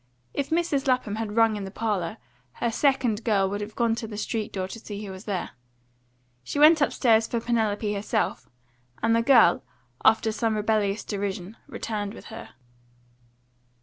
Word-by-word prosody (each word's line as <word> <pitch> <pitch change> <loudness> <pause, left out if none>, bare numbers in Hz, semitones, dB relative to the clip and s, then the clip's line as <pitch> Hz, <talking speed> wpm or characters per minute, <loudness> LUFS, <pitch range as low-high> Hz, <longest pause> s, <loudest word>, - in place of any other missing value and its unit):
If 280 - -2
Mrs. 320 -4 0
Lapham 250 -5 +1
had 220 -2 -4
rung 225 -1 +4
in 205 - -4
the 195 - -5
parlour, 205 -5 -2 0.4
her 235 - -1
second 255 -4 +1
girl 200 -4 +2
would 205 +1 -3
have 210 +1 -7
gone 235 -1 +2
to 225 - -4
the 210 -1 -7
street 215 0 -3
door 185 -1 -3
to 230 - -8
see 210 -1 -7
who 195 - -7
was 190 +2 -10
there. 195 -4 -3 0.9
She 285 - -5
went 305 +2 +7
upstairs 225 -5 +3
for 235 - -1
Penelope 220 -3 0
herself, 210 +2 -2 0.5
and 225 0 +3
the 230 - +3
girl, 230 -8 +5 0.4
after 220 0 +4
some 220 0 0
rebellious 210 -1 0
derision, 200 -1 -4
returned 210 -1 -4
with - - -12
her. 225 - -10
220 Hz, 170 wpm, -26 LUFS, 205-230 Hz, 0.9 s, went